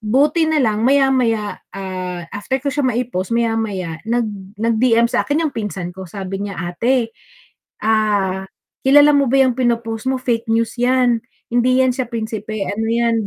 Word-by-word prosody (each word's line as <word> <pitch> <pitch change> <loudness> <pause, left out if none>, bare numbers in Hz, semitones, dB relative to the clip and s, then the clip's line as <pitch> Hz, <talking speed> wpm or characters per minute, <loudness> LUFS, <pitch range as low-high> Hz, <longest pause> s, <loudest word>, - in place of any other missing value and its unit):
buti 290 +9 +2
nalang 240 -9 +1
maya-maya, 255 -6 +2
ah, 185 -2 -5
after 235 +6 -2
ko 285 - -1
siya 285 -1 0
maipost 235 -6 -2
maya-maya 220 -8 -1
nag 235 0 +1 0.3
nag 230 +1 0
DM 235 -2 +4
sakin 290 +6 0
yung 295 - -4
pinsan 195 -5 -4
ko 190 +1 -8
sabi 195 +1 -5
niya, 200 -2 -6 0.2
"Ate, 235 +4 0 0.7
ah, 205 -4 +1 0.4
kilala 290 +2 +7
mo 280 -1 +3
ba 270 +1 +5
yung 255 - +2
pinopost 230 -1 -1
mo 265 - 0
fake 235 -3 -1
news 230 0 +1
yan, 245 -2 +3 0.3
hindi 250 +2 +3
yan 255 - +2
siya 255 -2 -3
prinsipe 220 -2 -4
ano 220 +3 -2
yan, 230 -2 +1
230 Hz, 160 wpm, -19 LUFS, 210-255 Hz, 0.7 s, kilala